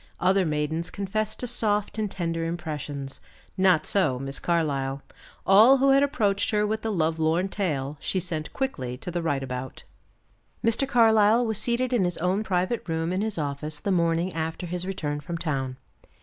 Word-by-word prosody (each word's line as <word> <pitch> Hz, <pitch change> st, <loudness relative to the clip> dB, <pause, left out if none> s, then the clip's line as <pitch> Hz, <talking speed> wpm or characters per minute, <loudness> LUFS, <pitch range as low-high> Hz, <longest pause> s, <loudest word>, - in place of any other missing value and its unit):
Other 185 Hz, 0 st, +3 dB
maidens 155 Hz, +2 st, -1 dB
confess 205 Hz, +2 st, -2 dB
to -, -, -1 dB
soft 215 Hz, -3 st, 0 dB
and 210 Hz, -1 st, -1 dB
tender 165 Hz, -3 st, -2 dB
impressions. 150 Hz, -5 st, -5 dB, 0.3 s
Not 185 Hz, -5 st, +3 dB
so 185 Hz, -11 st, +2 dB
Miss 135 Hz, +1 st, -4 dB
Carlyle. 140 Hz, -5 st, -1 dB, 0.4 s
All 220 Hz, +8 st, +7 dB
who 275 Hz, +1 st, +3 dB
had 275 Hz, +1 st, +5 dB
approached 210 Hz, -8 st, +1 dB
her 210 Hz, -2 st, +2 dB
with 220 Hz, +1 st, -1 dB
the 225 Hz, -, -2 dB
lovelorn 165 Hz, +1 st, +1 dB
tale, 150 Hz, -8 st, -2 dB
she 190 Hz, -, -1 dB
sent 160 Hz, -4 st, -3 dB
quickly 130 Hz, -, -3 dB
to 175 Hz, -, -6 dB
the 175 Hz, 0 st, -2 dB
right 145 Hz, -5 st, -1 dB
about. 130 Hz, 0 st, -6 dB, 0.8 s
Mr. 230 Hz, +4 st, +3 dB
Carlyle 225 Hz, -2 st, +4 dB
was 220 Hz, -2 st, 0 dB
seated 245 Hz, +3 st, 0 dB
in 235 Hz, -6 st, +3 dB
his 175 Hz, -1 st, -1 dB
own 180 Hz, +4 st, 0 dB
private 185 Hz, +3 st, 0 dB
room 165 Hz, +2 st, -1 dB
in 185 Hz, -, 0 dB
his 215 Hz, -3 st, -2 dB
office 150 Hz, 0 st, -3 dB
the 200 Hz, -, -2 dB
morning 170 Hz, 0 st, +1 dB
after 160 Hz, +2 st, -3 dB
his 180 Hz, +1 st, -3 dB
return 150 Hz, -6 st, -3 dB
from 170 Hz, +4 st, -5 dB
town. 135 Hz, -6 st, -2 dB
175 Hz, 175 wpm, -26 LUFS, 155-210 Hz, 0.8 s, All